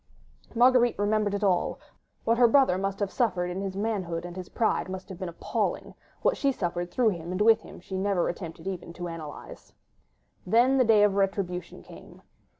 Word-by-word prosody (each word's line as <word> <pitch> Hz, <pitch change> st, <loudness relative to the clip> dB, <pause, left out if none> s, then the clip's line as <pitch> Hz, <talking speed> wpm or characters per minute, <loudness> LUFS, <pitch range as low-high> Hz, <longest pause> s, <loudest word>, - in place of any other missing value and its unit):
Marguerite 245 Hz, 0 st, +4 dB
remembered 205 Hz, 0 st, +1 dB
it 205 Hz, -, -3 dB
all: 190 Hz, -3 st, +1 dB, 0.5 s
what 230 Hz, +1 st, +2 dB
her 245 Hz, -, +7 dB
brother 230 Hz, -7 st, +4 dB
must 195 Hz, 0 st, -2 dB
have 200 Hz, -, -1 dB
suffered 180 Hz, -8 st, 0 dB
in 185 Hz, +2 st, -4 dB
his 195 Hz, -1 st, -4 dB
manhood 190 Hz, -6 st, -2 dB
and 175 Hz, 0 st, -8 dB
his 185 Hz, -1 st, -7 dB
pride 220 Hz, -4 st, 0 dB
must 190 Hz, 0 st, -7 dB
have 190 Hz, -2 st, -9 dB
been 185 Hz, -3 st, -4 dB
appalling; 170 Hz, -, -3 dB, 0.3 s
what -, -, +3 dB
she 280 Hz, -, +1 dB
suffered 175 Hz, -6 st, -3 dB
through 230 Hz, +5 st, +2 dB
him 170 Hz, -3 st, -5 dB
and 185 Hz, -, -3 dB
with 225 Hz, +1 st, +5 dB
him -, -, -12 dB
she 190 Hz, +2 st, -8 dB
never 195 Hz, -2 st, +1 dB
attempted 170 Hz, -1 st, -6 dB
even 180 Hz, -3 st, -5 dB
to 175 Hz, 0 st, -6 dB
analyse. 165 Hz, -4 st, -9 dB, 0.7 s
Then 245 Hz, +7 st, +3 dB
the -, -, +6 dB
day 215 Hz, -2 st, +5 dB
of 205 Hz, -1 st, +4 dB
retribution 195 Hz, -2 st, -2 dB
came. -, -, -14 dB
195 Hz, 190 wpm, -27 LUFS, 180-225 Hz, 0.7 s, her